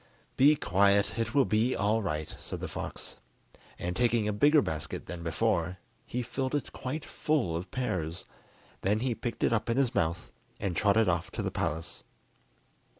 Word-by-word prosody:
"Be 145 +3 +6
quiet, 100 -1 +3
it 115 +1 -1
will 140 -2 +5
be 110 +4 +2
all 105 +3 +2
right," 75 -6 -3
said - - -5
the - - -4
fox; - - -5 0.6
and 90 0 -3
taking 115 0 +2
a 105 - 0
bigger 145 +7 +5
basket 75 -2 -4
than 85 -1 -6
before, 90 0 0 0.3
he 125 +1 -2
filled 130 +4 -2
it 145 - -2
quite 145 +4 -4
full 140 - 0
of 90 +3 -4
pears. 90 -9 -2 0.6
Then 105 +3 +1
he 125 -1 +1
picked 120 +1 -4
it - - +3
up 115 0 0
in 115 - +1
his 135 -3 +2
mouth, 85 +1 -1 0.3
and 95 -3 -2
trotted 105 +3 +4
off 85 -1 0
to - - -2
the - - -1
palace. 80 +3 -3
105 Hz, 175 wpm, -30 LUFS, 90-125 Hz, 0.6 s, Be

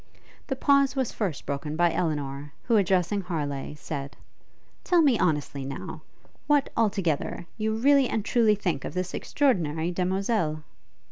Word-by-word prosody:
The 265 - -1
pause 280 0 +3
was 260 -3 0
first 185 -10 -3
broken 145 +2 -3
by 175 0 +3
Elinor, 145 -4 -2
who, 235 - +2
addressing 190 -1 +2
Harleigh, 150 -6 -4
said, 145 -2 -6 0.7
'Tell 350 -2 +4
me 265 -7 +4
honestly, 145 -4 0
now, 135 +1 -6 0.5
what, 290 -2 +3
all 225 -2 +3
together, 175 -5 -2
you 220 0 -1
really 275 +3 +4
and 215 -2 -1
truly 225 -3 +3
think 175 -9 -2
of - - -6
this 185 0 -2
extraordinary 170 - 0
demoiselle?' 180 -3 0
180 Hz, 145 wpm, -26 LUFS, 150-225 Hz, 0.7 s, Tell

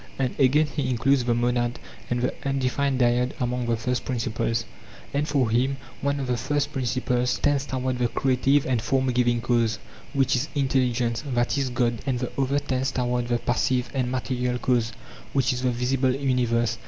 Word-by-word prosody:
And 130 -2 0
again 140 +3 +5
he 145 -3 -2
includes 130 +1 +2
the 120 -1 +2
monad 120 0 0 0.3
and 120 0 0
the 125 - 0
undefined 135 0 0
dyad 125 +1 +2
among 125 -1 -1
the 115 -1 +1
first 125 +1 -1
principles; 115 -2 -1 0.5
and 145 +1 0
for 135 -7 +1
him 130 +4 +1 0.2
one 140 +1 0
of 135 - -2
the 125 -1 0
first 145 +4 -1
principles 125 -1 0
tends 145 -1 +1
toward 130 -1 -2
the 120 - +2
creative 135 +3 +2
and 125 -3 0
form 130 +2 +1
giving 120 -1 +2
cause, 115 -2 +1 0.4
which 135 -2 +2
is 130 +5 -1
intelligence, 125 -4 +1
that 120 +2 +1
is 135 -2 0
god, 120 -2 0
and 130 -2 +1
the 125 0 -3
other 135 +1 +1
tends 130 -1 -1
toward 125 -1 -1
the 120 0 +1
passive 125 +1 0
and 130 -3 0
material 125 -1 -1
cause, 120 -2 +1 0.4
which 135 -2 +2
is 125 - -3
the 130 - +2
visible 125 +2 +1
universe. 120 -4 +1
125 Hz, 180 wpm, -25 LUFS, 120-135 Hz, 0.5 s, again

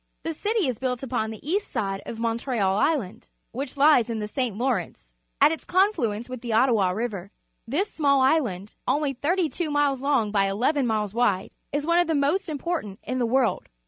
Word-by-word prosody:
The 325 - -2
city 420 +1 0
is 250 -4 -2
built 255 -1 -2
upon 240 -4 -1
tlie 220 - -8
east 385 +8 -1
side 195 -5 -2
of 230 - -5
Montreal 230 -3 0
Island, 230 - 0 0.2
which 270 +3 -5
lies 280 -5 +5
in 230 - -2
th 210 -1 -5
e - - -26
St. 250 -7 -1
Law 260 +3 +1
rence - - -5 0.3
at - - +6
its 325 - -4
confluence 250 - +1
with 255 -2 -7
the 235 -2 -3
Ottawa 225 -5 +3
River. 200 -2 -3 0.4
This 335 - -1
small 280 -3 +3
island, 245 - +1
only 280 +1 +1
tliirty 330 +7 0
two 345 -3 -3
miles 290 -3 +1
long 270 -7 +1
by 200 -2 +2
eleven 250 +7 +1
miles 210 -3 -1
wide, 210 -5 +1 0.2
is 290 +1 -1
one 340 +1 +3
of 350 - +2
the 325 - +1
most 320 +7 +1
important 300 - -3
in 255 - -3
the 240 - +1
world. 250 -1 +1
255 Hz, 205 wpm, -25 LUFS, 220-295 Hz, 0.4 s, at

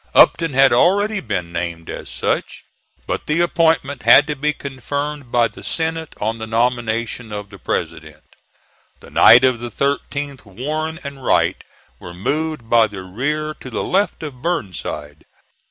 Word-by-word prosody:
Upton 165 -5 +5
had 135 -2 +6
already 200 - +3
been 95 - -3
named 85 -1 -4
as - - -7
such, - - -2 0.4
but - - -4
the 150 +2 +1
appointment 160 -6 +1
had 120 +5 +7
to 150 0 -3
be 150 +2 0
confirmed 140 0 -5
by 120 -1 +3
the 105 - -14
Senate 160 -1 -2
on 110 +2 -2
the 110 - -5
nomination 115 0 -1
of 105 -1 -6
the - - -12
President. - - -4 0.8
The - - -15
night 120 - +8
of 130 -3 +2
the 120 0 -5
13th 140 +2 -2
Warren 155 - -4
and 140 -2 -8
Wright - - +2 0.4
were 85 - -10
moved 150 - -2
by 115 -1 +5
the 100 -2 -8
rear 150 +11 -2
to 130 - -9
the 120 - -3
left 195 -2 0
of 135 -5 -8
Burnside. 80 - -4
130 Hz, 155 wpm, -20 LUFS, 110-150 Hz, 0.8 s, night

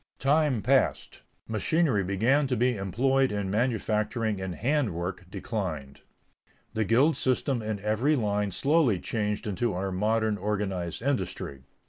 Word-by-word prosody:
Time 140 -4 +2
passed; 135 +3 +1 0.3
machinery 115 - +1
began 115 +10 +2
to 125 - -1
be 125 +2 +2
employed 130 +8 +1
in 100 -2 -2
manufacturing 110 -2 0
and 95 -2 -4
hand 125 - 0
work 90 +1 -4
declined. 90 - -5 0.7
The 110 -1 0
guild 130 - +4
system 130 -1 0
in 110 -1 -3
every 110 +9 +1
line 105 -4 0
slowly 135 - +2
changed 105 +1 -2
into 105 +2 -1
our 95 +2 -2
modern 110 +2 0
organized 95 -2 -2
industry. 95 - -2
110 Hz, 130 wpm, -27 LUFS, 95-130 Hz, 0.7 s, guild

